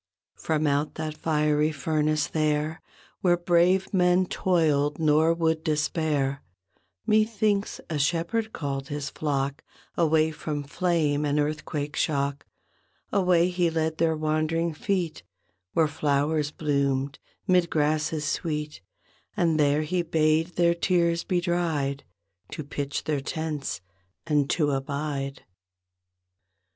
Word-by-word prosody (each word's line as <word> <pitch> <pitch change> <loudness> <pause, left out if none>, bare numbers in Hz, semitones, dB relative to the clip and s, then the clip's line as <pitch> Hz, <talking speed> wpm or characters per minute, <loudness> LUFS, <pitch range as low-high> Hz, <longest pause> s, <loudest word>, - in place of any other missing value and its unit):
From 155 -1 0
out 145 +1 0
that 155 -1 -4
fiery 150 -1 +1
furnace 155 0 0
there. 155 0 -1 0.4
Where 175 -2 +3
brave 175 +3 +2
men 180 0 +4
toiled 150 -6 +1
nor 155 +1 +3
would 160 -1 0
despair, 150 -3 0 0.6
Methinks 215 -1 +1
a 155 -3 -2
Shepherd 175 +10 0
called 135 -5 -4
his 145 -2 -4
flock 140 -1 -2 0.3
Away 160 -1 +3
from 150 -1 -4
flame 150 -1 0
and 145 0 +1
earthquake 150 0 -2
shock; 140 -1 -1 0.7
Away 180 -3 +3
He 175 -1 +1
led 160 0 -1
their 160 -1 +2
wandering 155 +2 0
feet 175 - -2 0.5
Where 160 -1 +3
flowers 145 0 0
bloomed, 140 -2 -1 0.3
'mid 180 -2 +3
grasses 150 0 0
sweet; 150 - -3 0.6
And 165 -3 +2
there 145 +1 +3
He 175 +4 0
bade 160 +1 +1
their 170 -1 +4
tears 170 -1 +1
be 180 - 0
dried; 165 -6 -1 0.5
To 155 - -5
pitch 140 0 -4
their 150 -3 -1
tents 150 - -4 0.4
and 150 -3 +1
to 150 -4 +2
abide. 140 0 -3
155 Hz, 115 wpm, -26 LUFS, 145-170 Hz, 0.7 s, men